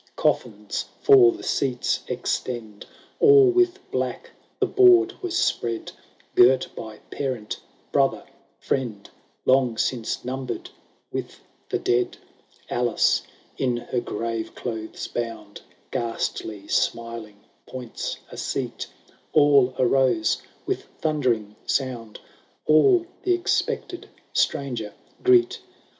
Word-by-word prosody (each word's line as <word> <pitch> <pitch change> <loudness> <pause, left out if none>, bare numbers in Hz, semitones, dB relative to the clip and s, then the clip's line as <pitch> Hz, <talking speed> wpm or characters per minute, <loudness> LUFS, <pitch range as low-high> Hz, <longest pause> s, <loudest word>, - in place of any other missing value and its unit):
Coffins - - -1 0.2
for 390 -4 +8
the 345 - -9
seats 130 -3 0
extend; 110 -5 -3 0.3
All 420 -3 +7
with 365 0 +3
black - - -3 0.3
the - - +3
board 370 -2 +6
was 355 -2 -2
spread, 115 -1 -1 0.4
Girt 130 +1 +5
by 110 -1 -8
parent, 130 -6 -3 0.3
brother, - - +2 0.3
friend, 115 -7 -3 0.4
Long 130 -3 +3
since 120 0 -1
numbered 130 0 -4 0.4
with - - -5 0.3
the - - 0
dead! 120 0 0 0.5
Alice, - - +2 0.4
in 125 -2 +1
her 120 +1 -2
grave 115 -1 -4
clothes 110 -3 -5
bound, 115 -3 -5 0.3
Ghastly 110 -3 -3
smiling, 115 -3 -2 0.3
points 125 -3 -5
a - - -9
seat; - - -3 0.5
All 140 -4 +5
arose, 125 -3 +2 0.2
with - - -2
thundering 125 -9 0
sound; 125 -5 -2 0.5
All 335 - +5 0.2
the 365 -1 +2
expected 355 0 -2 0.2
stranger 120 -7 -1 0.3
greet. 375 +2 +4
125 Hz, 100 wpm, -24 LUFS, 115-155 Hz, 0.5 s, for